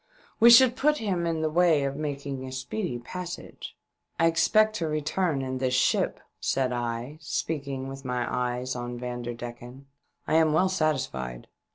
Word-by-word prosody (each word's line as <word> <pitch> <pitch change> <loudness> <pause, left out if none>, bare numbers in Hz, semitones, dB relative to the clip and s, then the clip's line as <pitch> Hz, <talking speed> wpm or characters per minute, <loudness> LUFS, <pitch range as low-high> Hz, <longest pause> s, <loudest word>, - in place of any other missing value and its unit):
We 235 - +8
should 245 +1 +8
put 300 +3 +2
him 185 - -1
in 160 -1 -1
the 155 - +1
way 165 -3 +4
of 140 0 -2
making 140 -2 -4
a 130 - -7
speedy 130 - -3
passage." 175 +9 -8 0.2
" - - -46
I 165 - +4
expect 190 +7 +3
to 165 - -2
return 155 0 -1
in 130 0 -3
this 130 -1 0
ship," 130 - +2 0.2
said 130 -2 0
I, 120 +4 -4
speaking 140 -3 -3
with 135 0 -8
my 125 -2 -1
eyes 125 +1 -2
on 120 0 -5
Vanderdecken. 120 +1 -7 0.4
"I - - 0
am 160 -1 +4
well 185 +4 +3
satisfied. 130 - -2
140 Hz, 165 wpm, -27 LUFS, 125-165 Hz, 0.4 s, We